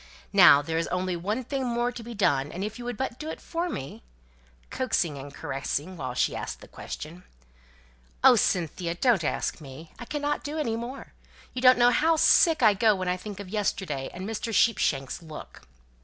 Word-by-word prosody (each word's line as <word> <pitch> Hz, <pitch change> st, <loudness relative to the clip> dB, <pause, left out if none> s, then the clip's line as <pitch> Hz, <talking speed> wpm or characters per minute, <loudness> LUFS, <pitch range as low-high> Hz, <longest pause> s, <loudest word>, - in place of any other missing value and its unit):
Now 175 Hz, -7 st, +8 dB
there's 165 Hz, +2 st, -1 dB
only 180 Hz, 0 st, -2 dB
one 210 Hz, +9 st, -2 dB
thing 270 Hz, +2 st, -3 dB
more 240 Hz, 0 st, 0 dB
to 245 Hz, -, -8 dB
be 235 Hz, +1 st, -8 dB
done; 145 Hz, -8 st, +1 dB
and 185 Hz, -, -5 dB
if 215 Hz, +3 st, -5 dB
you 240 Hz, -, -7 dB
would 245 Hz, -3 st, -4 dB
but 265 Hz, -2 st, -4 dB
do 310 Hz, -, -5 dB
it -, -, -6 dB
for 345 Hz, +1 st, -3 dB
me 135 Hz, -, -6 dB, 0.4 s
" -, -, -32 dB
(coaxing 220 Hz, -, 0 dB
and 140 Hz, +1 st, -9 dB
caressing 140 Hz, +6 st, -4 dB
while 130 Hz, -6 st, -5 dB
she -, -, +1 dB
asked -, -, -5 dB
the -, -, -12 dB
question). 165 Hz, +4 st, -8 dB, 1.0 s
"Oh, -, -, +8 dB
Cynthia, 170 Hz, 0 st, 0 dB
don't 220 Hz, -2 st, +2 dB
ask 155 Hz, -, -2 dB
me; 145 Hz, +3 st, -11 dB
I 240 Hz, -, -7 dB
cannot 295 Hz, +2 st, -2 dB
do 300 Hz, +1 st, -5 dB
any 235 Hz, -8 st, -1 dB
more. 240 Hz, +4 st, -7 dB, 0.4 s
You 250 Hz, -, -4 dB
don't 255 Hz, 0 st, +7 dB
know 245 Hz, 0 st, +5 dB
how 320 Hz, +7 st, +3 dB
sick 320 Hz, -1 st, +4 dB
I 215 Hz, -2 st, +7 dB
go 215 Hz, +1 st, +3 dB
when 185 Hz, -1 st, -3 dB
I 180 Hz, -, +1 dB
think 200 Hz, +1 st, -8 dB
of 200 Hz, -2 st, -8 dB
yesterday, 190 Hz, -9 st, -2 dB
and 185 Hz, +2 st, -7 dB
Mr. 225 Hz, +1 st, -4 dB
Sheepshanks' 170 Hz, -, +1 dB
look." 155 Hz, -2 st, -11 dB
200 Hz, 200 wpm, -27 LUFS, 160-245 Hz, 1.0 s, Now